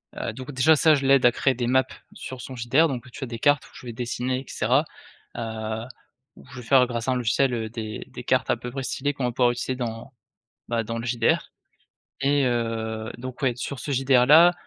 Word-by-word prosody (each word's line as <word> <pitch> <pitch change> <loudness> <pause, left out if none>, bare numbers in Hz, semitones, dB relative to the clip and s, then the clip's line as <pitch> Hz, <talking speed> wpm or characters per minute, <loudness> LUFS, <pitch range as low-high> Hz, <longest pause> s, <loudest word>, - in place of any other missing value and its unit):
Heu, - - -4
donc 130 +2 -8
déjà 150 +4 +4
ça 155 +1 +5
je 135 -1 -2
l'aide 135 -2 +5
à 120 - +7
créer 130 +2 +1
des 120 -1 -2
maps 130 +1 +3 0.3
sur 130 -2 -8
son 130 - -8
JDR, 130 +7 +3
donc 130 -3 -5
tu 135 - -8
as - - -3
des 115 -1 -6
cartes 145 +1 +3
où - - -17
je - - -12
vais 120 - -6
dessiner 125 +2 -2
et - - -14
cetera. 130 +8 +1 0.5
Heu, 110 0 -4 0.5
où - - -16
je 135 - -11
vais - - -13
faire 130 -2 +6
grâce 120 0 -4
à - - +2
un - - +1
logiciel, 125 +2 +1
heu, 110 -2 -3
des 110 -2 -6
des - - -9
cartes - - +1
à - - +2
peu 125 - -7
près 135 0 -4
stylées 145 +3 -2
qu'on 135 -3 -3
va 125 - 0
pouvoir 120 0 +3
utiliser 120 +2 -3
dans 120 +1 -5 0.6
ben, 115 -1 0
dans 115 +2 -4
le 115 - -5
JDR 120 -1 +1 0.7
et 140 0 +2
heu, 115 -2 -2
donc 130 +1 -8
ouais, 125 -4 +1
sur 135 +2 -5
ce 145 - -4
JDR-là, 135 +6 +6
125 Hz, 235 wpm, -25 LUFS, 115-135 Hz, 0.7 s, à